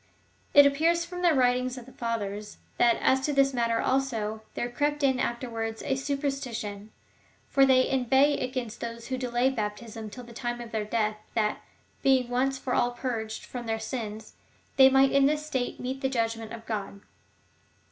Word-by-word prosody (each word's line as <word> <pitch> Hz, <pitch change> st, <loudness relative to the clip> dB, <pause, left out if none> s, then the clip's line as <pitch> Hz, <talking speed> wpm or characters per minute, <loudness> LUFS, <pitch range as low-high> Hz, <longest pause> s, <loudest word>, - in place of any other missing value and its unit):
It 285 Hz, 0 st, +10 dB
appears 330 Hz, +5 st, +2 dB
from 355 Hz, +1 st, -7 dB
the 350 Hz, -1 st, +5 dB
writings 250 Hz, 0 st, +2 dB
of 245 Hz, -, -9 dB
the 260 Hz, -, -14 dB
Fathers, 210 Hz, -4 st, -4 dB, 0.2 s
that 235 Hz, -1 st, +5 dB
as 265 Hz, 0 st, +3 dB
to 290 Hz, +2 st, -1 dB
this 275 Hz, -1 st, +3 dB
matter, 230 Hz, -2 st, +1 dB
also, 225 Hz, -5 st, -1 dB
there 240 Hz, -, -1 dB
crept 290 Hz, +4 st, -1 dB
in 265 Hz, -2 st, +3 dB
afterwards 230 Hz, -2 st, -3 dB
a 270 Hz, -, 0 dB
superstition, 265 Hz, -7 st, -3 dB, 0.6 s
for 275 Hz, -1 st, +5 dB
they 255 Hz, -1 st, +5 dB
inveigh 265 Hz, +3 st, +3 dB
against 250 Hz, -3 st, -4 dB
those 235 Hz, 0 st, -6 dB
who 260 Hz, -, -1 dB
delayed 250 Hz, +1 st, +1 dB
baptism 215 Hz, 0 st, -4 dB
till 250 Hz, +4 st, -9 dB
the 235 Hz, 0 st, -12 dB
time 240 Hz, +1 st, -3 dB
of 235 Hz, -1 st, -8 dB
their 220 Hz, -2 st, -2 dB
death, 215 Hz, -1 st, 0 dB, 0.2 s
that, 215 Hz, -1 st, 0 dB, 0.4 s
being 260 Hz, -2 st, +3 dB
once 265 Hz, +2 st, +1 dB
for 260 Hz, -1 st, -3 dB
all 240 Hz, -, +3 dB
purged 230 Hz, -3 st, -4 dB
from 250 Hz, -, -6 dB
all 235 Hz, -, -9 dB
their 225 Hz, 0 st, -1 dB
sins, 220 Hz, -2 st, -5 dB, 0.4 s
they 265 Hz, -1 st, +8 dB
might 270 Hz, 0 st, +5 dB
in 275 Hz, 0 st, +5 dB
this 300 Hz, +1 st, 0 dB
state 260 Hz, -5 st, -2 dB
meet 260 Hz, +2 st, -4 dB
the 265 Hz, -, +1 dB
judgment 225 Hz, -3 st, -2 dB
of 230 Hz, -1 st, -8 dB
God. 200 Hz, -2 st, -4 dB
245 Hz, 180 wpm, -28 LUFS, 225-270 Hz, 0.6 s, It